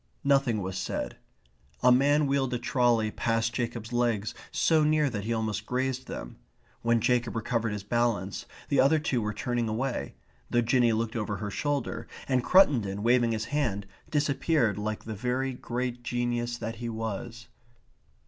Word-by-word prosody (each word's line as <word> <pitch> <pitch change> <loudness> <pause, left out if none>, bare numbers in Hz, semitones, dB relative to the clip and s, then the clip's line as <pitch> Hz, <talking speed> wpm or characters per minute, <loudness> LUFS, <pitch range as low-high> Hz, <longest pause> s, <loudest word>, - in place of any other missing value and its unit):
Nothing 135 -7 +2
was 95 0 -3
said. - - -3 0.7
A 125 - +7
man 145 +4 +4
wheeled 135 -2 +1
a - - +1
trolley 120 -3 +2
past 115 0 0
Jacob's 120 -1 -3
legs 120 -4 +1 0.2
so 160 -2 +3
near 150 -2 +3
that 105 -3 -4
he 115 - -2
almost 110 -2 -2
grazed 130 0 -1
them. - - -7 0.4
When 115 0 +3
Jacob 120 +1 +1
recovered 115 0 -1
his 105 -1 -4
balance 105 -3 -1 0.2
the 140 - +2
other 140 +4 +5
two 140 -6 0
were 105 0 -1
turning 120 +2 -1
away, 120 +4 -2 0.3
though 120 - +3
Jinny 120 0 +3
looked 110 +1 -1
over 105 -3 -2
her 105 +1 -4
shoulder, 140 -3 -2 0.2
and 130 -2 +2
Cruttendon, 115 - +4
waving 120 0 +4
his 110 0 -1
hand, 115 -10 -1 0.2
disappeared 145 - +1
like 110 +1 -3
the 110 - -5
very 125 +5 -1
great 125 0 -3
genius 120 0 -1
that 115 -1 -5
he 120 0 -4
was. 115 +2 -5
120 Hz, 160 wpm, -28 LUFS, 110-130 Hz, 0.7 s, A